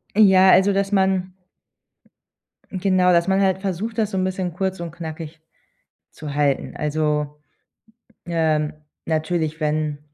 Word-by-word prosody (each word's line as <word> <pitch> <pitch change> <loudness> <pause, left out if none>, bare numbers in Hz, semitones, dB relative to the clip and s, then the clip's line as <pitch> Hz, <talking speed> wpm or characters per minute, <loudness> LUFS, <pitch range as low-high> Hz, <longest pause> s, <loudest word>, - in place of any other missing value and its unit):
Äh, 215 - +3
ja, 190 -1 +6
also, 190 +2 +5
dass 195 +1 -1
man 190 -2 +1 1.4
hm, 185 - -5
genau, 185 -2 +3
dass 170 +1 +2
man 190 0 +2
halt 190 -1 +1
versucht, 200 +4 -4
das 215 -1 +1
so - - -4
'n 185 - +1
bisschen 185 -1 -2
kurz 190 +1 -3
und 170 -2 -6
knackig 160 -1 -8 0.7
zu 150 -2 -8
halten. 145 -2 0
Also, 150 -1 -1 0.9
ähm, 160 -3 0 0.3
natürlich, 160 0 -1
wenn 150 -1 -1
175 Hz, 140 wpm, -22 LUFS, 155-190 Hz, 1.4 s, ja